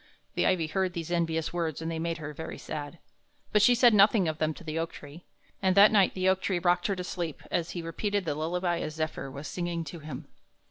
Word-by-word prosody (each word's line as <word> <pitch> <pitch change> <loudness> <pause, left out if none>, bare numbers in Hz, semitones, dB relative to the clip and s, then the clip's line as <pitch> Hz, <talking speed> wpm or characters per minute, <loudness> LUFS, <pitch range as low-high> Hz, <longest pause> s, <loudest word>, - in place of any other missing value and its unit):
The - - +1
ivy 175 -3 +2
heard 185 +3 -1
these 170 -1 -5
envious 165 -2 0
words, 165 -4 -2
and 165 0 -3
they 165 - -3
made 165 0 -2
her 150 -1 -6
very 160 +3 -7
sad; 145 +2 -6 0.5
but 210 - +4
she 245 +4 +6
said 240 -1 +6
nothing 200 -2 +5
of 155 0 -2
them 155 0 +1
to - - -12
the 160 0 -3
oak 165 0 -2
tree, 145 +4 -11 0.4
and 190 0 +2
that 205 +1 +9
night 200 -3 +4
the 185 0 0
oak 190 0 +3
tree 190 -2 0
rocked 175 0 +2
her 200 - 0
to 180 - -4
sleep 175 -4 -4
as 170 0 0
he 170 - -4
repeated 200 +4 -2
the 150 - 0
lullaby 175 +3 -1
a 155 - -3
zephyr 155 -3 -4
was 140 +3 -7
singing 175 -2 -3
to 165 +2 -8
him. 150 -4 -7
170 Hz, 240 wpm, -29 LUFS, 160-185 Hz, 0.5 s, that